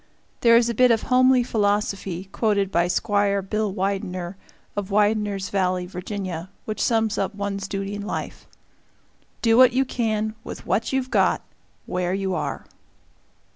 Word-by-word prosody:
There 230 Hz, -1 st, +6 dB
is 235 Hz, 0 st, +3 dB
a 235 Hz, -, -1 dB
bit 250 Hz, +3 st, +5 dB
of 230 Hz, -2 st, +2 dB
homely 255 Hz, 0 st, +4 dB
philosophy, 205 Hz, -5 st, -1 dB
quoted 200 Hz, -2 st, +1 dB
by 170 Hz, -1 st, +2 dB
Squire 200 Hz, +1 st, +1 dB
Bill 210 Hz, +1 st, -1 dB
Widener, 185 Hz, -2 st, -3 dB, 0.4 s
of 205 Hz, -1 st, -3 dB
Widener's 205 Hz, -2 st, +1 dB
Valley, 185 Hz, -2 st, 0 dB
Virginia, 180 Hz, -1 st, -5 dB, 0.2 s
which 215 Hz, -, -4 dB
sums 225 Hz, -2 st, +1 dB
up -, -, -2 dB
one's 200 Hz, -1 st, -3 dB
duty 195 Hz, 0 st, -4 dB
in 205 Hz, -, -4 dB
life: 205 Hz, -, -5 dB, 1.0 s
"Do 225 Hz, -1 st, +4 dB
what 255 Hz, -1 st, +7 dB
you 265 Hz, +1 st, +2 dB
can, 220 Hz, -4 st, -1 dB
with -, -, -8 dB
what 225 Hz, -, 0 dB
you've 265 Hz, -1 st, -1 dB
got, -, -, +2 dB, 0.4 s
where 180 Hz, 0 st, -1 dB
you 195 Hz, -1 st, -1 dB
are." -, -, -3 dB
205 Hz, 150 wpm, -23 LUFS, 190-225 Hz, 1.0 s, what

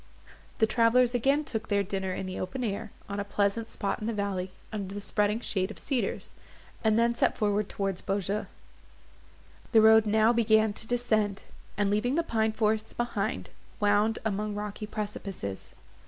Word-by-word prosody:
The 220 Hz, -, +4 dB
travellers 235 Hz, +2 st, +3 dB
again 275 Hz, +5 st, +2 dB
took 220 Hz, -6 st, -4 dB
their 200 Hz, -1 st, +2 dB
dinner 190 Hz, -1 st, -3 dB
in 185 Hz, -, -3 dB
the 185 Hz, 0 st, -5 dB
open 185 Hz, +8 st, -3 dB
air, 215 Hz, 0 st, -3 dB, 0.2 s
on 200 Hz, 0 st, -4 dB
a -, -, 0 dB
pleasant 200 Hz, +2 st, 0 dB
spot 200 Hz, -, -2 dB
in 215 Hz, -, -4 dB
the 230 Hz, -, -1 dB
valley, 200 Hz, -3 st, -2 dB, 0.2 s
under 200 Hz, -2 st, -4 dB
the -, -, -3 dB
spreading 210 Hz, +1 st, +1 dB
shade 190 Hz, -4 st, 0 dB
of 215 Hz, -, -9 dB
cedars; 270 Hz, -4 st, -2 dB, 0.5 s
and 220 Hz, -1 st, +3 dB
then 235 Hz, +1 st, +3 dB
set -, -, +1 dB
forward 210 Hz, -1 st, +1 dB
towards 195 Hz, -2 st, -2 dB
Beaujeu. 200 Hz, +1 st, -1 dB, 1.3 s
The 220 Hz, -, +8 dB
road 220 Hz, 0 st, +7 dB
now 220 Hz, +2 st, +4 dB
began 220 Hz, -2 st, +3 dB
to 220 Hz, -, -5 dB
descend, 215 Hz, -5 st, 0 dB, 0.3 s
and, 200 Hz, -1 st, +2 dB
leaving 240 Hz, +6 st, +1 dB
the 335 Hz, -, +2 dB
pine 220 Hz, -6 st, +1 dB
forests 215 Hz, 0 st, 0 dB
behind, 235 Hz, -2 st, -2 dB, 0.3 s
wound 210 Hz, +1 st, +3 dB
among 210 Hz, 0 st, -1 dB
rocky 210 Hz, +1 st, -5 dB
precipices. 200 Hz, -, -5 dB
215 Hz, 170 wpm, -29 LUFS, 200-225 Hz, 1.3 s, The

